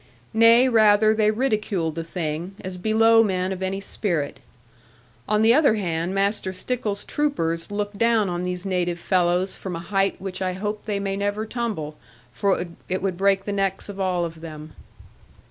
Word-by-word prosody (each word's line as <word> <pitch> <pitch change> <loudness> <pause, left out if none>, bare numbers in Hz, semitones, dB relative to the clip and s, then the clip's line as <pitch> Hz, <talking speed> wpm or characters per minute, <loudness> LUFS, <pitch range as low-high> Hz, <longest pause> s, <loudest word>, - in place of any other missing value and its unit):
Nay, 230 +3 +6
rather 215 -2 +5
they 215 -1 +3
ridiculed 210 -8 0
the 165 +1 -4
thing, 165 +2 -4
as 185 -1 -6
below 225 +3 +5
men 185 -3 0
of 190 -1 -5
any 190 +1 -2
spirit. 175 -7 -2 0.9
On 210 +1 +3
the 225 +1 +6
other 280 -5 +4
hand, 175 -2 -2
Master 195 -1 0
Stickles's 210 +1 -3
troopers 170 - -1
looked 205 0 -4
down 230 -3 +3
on 175 -1 -2
these 180 +1 -3
native 180 -2 -1
fellows 180 +1 +1
from 185 -3 -6
a - - -4
height 195 +2 0
which 190 0 -6
I 185 -1 0
hope 210 +3 -4
they 205 -2 -1
may 195 -1 -2
never 205 +2 -2
tumble, 215 -11 -4 0.4
for 190 +4 +1 0.2
it 185 0 -2
would 190 -2 0
break 195 +1 +2
the 205 - -3
necks 195 0 -1
of 200 -1 -7
all 180 -2 0
of 165 -1 -8
them. 155 -1 -9
195 Hz, 175 wpm, -23 LUFS, 180-215 Hz, 0.9 s, Nay